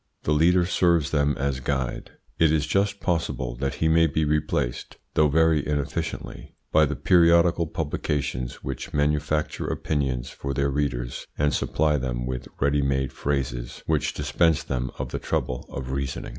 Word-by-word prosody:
The - - 0
leader 85 +4 +4
serves 85 -5 +2
them 75 -1 +1
as 70 -1 -1
guide. 65 -2 -2 0.3
It 80 -2 +5
is 75 -1 +2
just 100 +5 0
possible 80 -9 -1
that 70 +2 -2
he 80 - +1
may 80 +1 +5
be 80 +1 0
replaced, 75 -5 -1 0.2
though 75 - +4
very 80 0 +3
inefficiently, 75 -2 -4 0.2
by 75 -1 +5
the 75 - -3
periodical 85 +2 +4
publications 70 -5 -3
which 65 +1 -5
manufacture 75 +1 0
opinions 65 -5 -2
for 70 -1 -5
their 70 +1 +1
readers 65 -4 -2
and 75 0 +2
supply 75 -1 +1
them - - -3
with 60 -1 -4
ready 70 +1 +2
made 65 -1 0
phrases - - -3
which - - 0
dispense 75 +3 +2
them 65 -1 -2
of - - -4
the - - -3
trouble 60 0 -2
of 65 0 -5
reasoning. 70 0 -3
75 Hz, 155 wpm, -25 LUFS, 65-80 Hz, 0.3 s, It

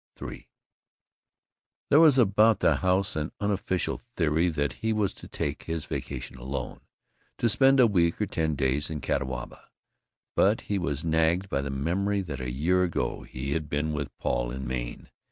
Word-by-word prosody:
III - - -8 1.4
There 145 - +7
was 155 -5 +7
about 110 -2 +4
the - - +4
house 95 +1 +1
an 75 +1 -2
unofficial 100 -3 -1
theory 80 0 +2
that 75 -3 -1
he 110 0 +1
was 105 -3 0
to - - -12
take 70 +1 -4
his 80 -2 -3
vacation 65 -1 -5
alone, 65 0 -5 0.6
to 120 - +2
spend 135 +4 +5
a 125 - +8
week 85 -6 +2
or 105 - +1
ten 80 -4 -1
days 70 +1 0
in 80 -1 -4
Catawba, 65 -2 -4 0.7
but 105 +3 +3
he 100 -1 -2
was 75 -3 -2
nagged 80 +4 +2
by 70 - 0
the 70 - -4
memory 90 +9 0
that 75 -8 -6
a 65 - -3
year 80 +9 +1
ago 90 -3 -1
he 65 +2 -6
had 75 0 -2
been 75 +2 -1
with 70 -3 -4
Paul - - -1
in 65 +2 -5
Maine. - - -5
80 Hz, 170 wpm, -27 LUFS, 70-100 Hz, 1.4 s, a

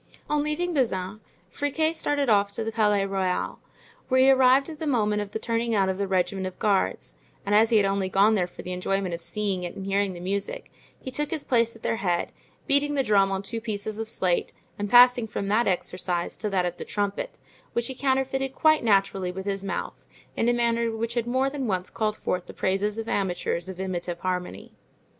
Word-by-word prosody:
On 300 0 +1
leaving 315 +4 -1
Bazin, 215 - -1 0.3
Friquet 315 - 0
started 290 -3 0
off 205 -3 +4
to 225 - -2
the 225 - -3
Palais 210 -3 +2
Royal, 190 -2 -1 0.5
where 260 -1 +3
he 265 +1 +7
arrived 265 +1 +5
at 310 -2 -8
the 315 - -3
moment 210 -6 +1
of 205 - -5
the 210 - -4
turning 230 0 -1
out 195 -2 +2
of 190 +1 -2
the 200 - 0
regiment 190 0 0
of 185 - -8
guards; 200 -3 0 0.3
and 200 - 0
as 220 +2 +5
he 225 - +4
had 205 - +4
only 195 -1 0
gone 200 +3 +4
there 185 -4 +1
for - - -11
the 180 - -6
enjoyment 185 0 -1
of 170 - -5
seeing 200 0 -1
it 175 -1 -5
and 195 - -6
hearing 195 0 0
the 175 - -9
music, 200 - -4 0.3
he 260 - -7
took 295 +3 -1
his 315 -1 -3
place 230 -2 +2
at 225 - -16
their 225 - 0
head, 175 -5 -1 0.3
beating 290 0 +2
the 275 - +2
drum 200 -4 +3
on 195 0 -2
two 225 +3 -5
pieces 215 -1 -4
of 225 0 -4
slate 180 -4 0 0.3
and 205 0 -2
passing 245 0 +7
from 200 -2 -4
that 225 +4 +2
exercise 180 -1 -1
to 215 - -3
that 190 -2 +1
of 175 0 -3
the - - -5
trumpet, 205 - -3 0.4
which 235 - 0
he 265 - -2
counterfeited 265 0 0
quite 310 -3 +4
naturally 195 -4 +2
with 190 +1 -7
his 195 -1 -2
mouth 195 - -4 0.3
in 235 - +1
a - - +3
manner 235 -1 +1
which 225 +1 -3
had 235 -1 -1
more 260 +2 +1
than 275 -2 -3
once 185 -3 -2
called 215 -1 -1
forth 180 -1 -2
the - - -10
praises 200 +3 0
of 225 0 -4
amateurs 180 -3 -1
of 185 -1 -8
imitative 175 -2 -3
harmony. 180 -1 -4
210 Hz, 220 wpm, -26 LUFS, 190-245 Hz, 0.5 s, he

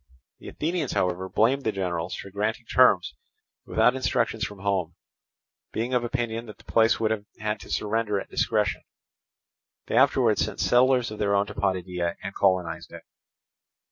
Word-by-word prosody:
The - - -12
Athenians, 165 -3 -2
however, 90 +1 -1
blamed 130 +8 +2
the 110 - +1
generals 90 -3 -3
for 100 - -9
granting 110 +4 -2
terms 105 - +4 0.5
without 125 - +3
instructions 115 -3 0
from 105 -3 -4
home, 95 -4 -1 0.8
being 120 +3 -2
of 125 -1 +2
opinion 120 -1 -3
that 105 - -10
the - - -19
place 115 0 +3
would 110 -1 +1
have 105 -2 -2
had 105 0 -2
to - - -12
surrender 105 -1 0
at - - -8
discretion. - - 0 1.0
They - - -3
afterwards - - +4
sent - - -5
settlers 125 -1 +3
of 110 - -8
their 100 -1 +2
own 100 0 +2
to 105 - -9
Potidæa, 90 -3 -1
and 100 +1 -5
colonized 90 -4 0
it. - - -10
105 Hz, 165 wpm, -26 LUFS, 95-115 Hz, 1.0 s, terms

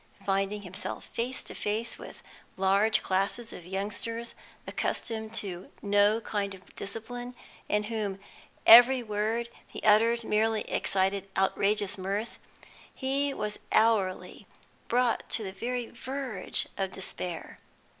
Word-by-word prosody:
Finding 195 +1 0
himself 185 0 -5
face 250 +3 -3
to - - -6
face 220 +3 -2
with - - -11 0.3
large 195 +3 +3
classes 200 +5 -1
of 175 - -10
youngsters 215 +5 -4 0.3
accustomed 220 -1 -3
to 190 -4 -3
no 205 +2 +4
kind 200 -3 -2
of 185 - -18
discipline, 245 +4 -6 0.3
in 210 0 +2
whom 210 -3 -2 0.5
every 245 +2 +9
word 220 +2 -1 0.2
he - - -7
uttered 230 +2 +5
merely 220 0 +2
excited 195 0 0
outrageous 200 +1 +1
mirth, 200 +4 -3 0.5
he 275 +1 0
was 210 -5 -3
hourly 215 -4 +2 0.4
brought 245 0 +1
to 225 - +4
the 190 - -4
very 245 +4 -2
verge 255 -5 -2
of 190 -1 -1
despair. 180 -2 -5
210 Hz, 120 wpm, -29 LUFS, 195-230 Hz, 0.5 s, every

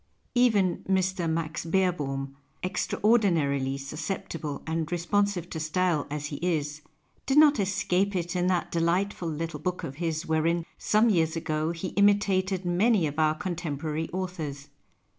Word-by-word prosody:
Even 210 -8 +3
Mr. 190 -2 +1
Max 160 0 -2
Bccrbohm, 150 -7 0 0.3
extraordinarily 170 - +1
sus 140 +3 -7
ceptible 160 -6 -4
and 160 0 -2
responsive 180 +1 0
to 160 - -4
style 160 0 0
as 150 0 -4
he 145 -1 -4
is, 155 -3 -1 0.5
did 270 +2 +2
not 300 -1 +7
escape 195 0 +1
it 175 0 -2
in 180 0 +1
that 180 -2 0
delightful 170 +2 0
little 160 0 -4
book 180 +3 -3
of 135 0 -6
his 165 -1 -2
wherein, 165 +1 +1
some 220 +2 +3
years 160 -4 +2
ago, 155 -1 -1
he 170 +2 -4
imitated 195 -2 +2
many 185 +2 +3
of 150 +1 -3
our 155 0 +3
contempo 170 -6 -4
rary 160 +1 -2
authors. 160 -6 -5
170 Hz, 145 wpm, -27 LUFS, 155-190 Hz, 0.5 s, not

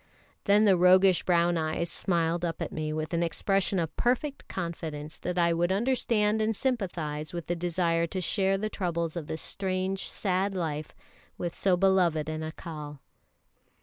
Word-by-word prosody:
Then 205 +1 +5
the 195 -2 +6
roguish 185 +1 +5
brown 175 -1 +2
eyes 160 +1 -2
smiled 170 -2 0
up 165 -1 -2
at 165 - -3
me 155 -1 -3
with 155 +2 -3
an 170 - +1
expression 195 +3 +1
of 165 -3 -2
perfect 255 +4 0
confidence 160 -4 -5
that 180 0 -3
I 170 -1 +3
would 175 +2 +1
understand 220 -1 +1
and 220 0 +1
sympathise 175 - -2
with 170 -2 -4
the 175 - -1
desire 170 -1 0
to 185 - -4
share 195 +2 +1
the 215 +2 -2
troubles 170 -5 -2
of 165 -4 -5
this 160 - -4
strange, 190 0 -2
sad 195 0 -1
life 155 -4 -3 0.4
with 175 -1 -3
so 185 -2 +2
beloved 175 -5 +2
an 155 0 -3
Accal. 155 -2 -7
175 Hz, 165 wpm, -28 LUFS, 165-195 Hz, 0.4 s, the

